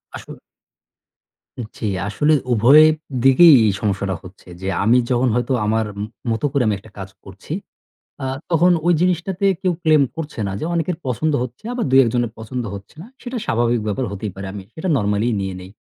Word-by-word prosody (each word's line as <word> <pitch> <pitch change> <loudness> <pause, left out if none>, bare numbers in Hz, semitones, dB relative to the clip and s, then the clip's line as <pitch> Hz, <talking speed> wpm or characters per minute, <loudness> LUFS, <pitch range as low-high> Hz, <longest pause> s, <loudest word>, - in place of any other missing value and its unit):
আসল - - -9 1.4
জি, - - -5 0.2
আসলে 150 +9 +1 0.2
উভয় 125 +7 +7 0.4
দিকেই 145 +5 +7
এই 105 - +3
সমস্যাটা 100 -2 -1
হচ্ছে 95 +1 -15
যে 95 - -4 0.2
আমি 115 +4 +4
যখন 125 +1 +2
হয়তো 125 +2 0
আমার 110 +1 +1 0.5
মতো 115 +6 -1
করে 140 -2 +1
আমি 105 - +1
একটা 110 +1 -17
কাজ 95 0 -7
করছি, 100 - -9 0.7
আ - - -2 0.3
তখন 175 +2 +4 0.2
ওই 175 - +5
জিনিসটাতে 180 +2 0 0.2
কেউ 185 - +2
claim 155 -2 +5
করছে 150 -7 -6
না, 95 - -3
যে - - -3
অনেকের 170 0 -1
পছন্দ 150 +6 0
হচ্ছে 125 - -8
বা, - - 0
২-১ 130 -2 +5
জনের 120 -2 0
পছন্দ 120 +2 -5
হচ্ছে 100 0 -11
না। - - -11 0.2
সেটা 250 0 -6
স্বাভাবিক 120 0 +1
ব্যাপার 105 +5 -1
হতেই 100 +1 -5
পারে। 95 0 -7
আমি 100 -2 -7
সেটা 165 +4 -4
normally 105 0 0
-ই - - 0
নিয়ে 95 -1 -4
নেই। 90 +1 -11
120 Hz, 180 wpm, -20 LUFS, 105-155 Hz, 1.4 s, উভয়